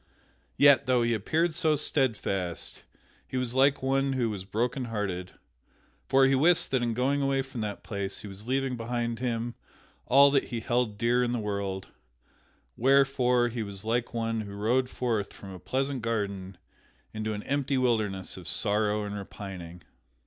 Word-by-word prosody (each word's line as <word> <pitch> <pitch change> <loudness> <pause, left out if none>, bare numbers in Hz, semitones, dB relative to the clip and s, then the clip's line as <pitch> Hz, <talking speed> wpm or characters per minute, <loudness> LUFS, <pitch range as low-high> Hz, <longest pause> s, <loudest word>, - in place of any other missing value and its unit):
Yet, 140 -1 +6
though 125 -2 +3
he 115 0 +2
appeared 160 - +1
so 155 -2 +2
steadfast, 105 - -1 0.5
he 130 - -4
was 125 -2 -1
like 135 +1 +3
one 135 +1 +1
who 120 -4 0
was 95 -3 -6
brokenhearted, 105 -4 -2 0.7
for 135 0 +5
he 135 - +3
wist 160 +6 +3
that 130 -2 +2
in 120 -2 -1
going 135 +4 +1
away 135 -1 +1
from 130 -3 -7
that 105 -2 -4
place 100 -2 -4
he - - -6
was 100 +3 -9
leaving 135 0 0
behind 120 0 -2
him 120 -1 -2 0.5
all 140 +2 +7
that 140 -1 +2
he 120 -2 -4
held 120 -3 0
dear 120 +3 +2
in 120 0 0
the - - 0
world, 100 -3 -3 0.9
wherefore 130 -2 +3
he 120 0 -4
was 100 -1 -5
like 115 +1 0
one 115 -1 -1
who 100 -1 -8
rode 125 +5 +1
forth 115 -6 -2
from 100 - -10
a 90 - -9
pleasant 135 +3 -2
garden 100 -4 -3 0.6
into 110 0 -2
an 105 0 -5
empty 140 0 0
wilderness 110 -7 0
of - - -10
sorrow 105 0 +1
and 100 - -5
repining. 95 -4 -8
120 Hz, 165 wpm, -28 LUFS, 105-130 Hz, 0.9 s, all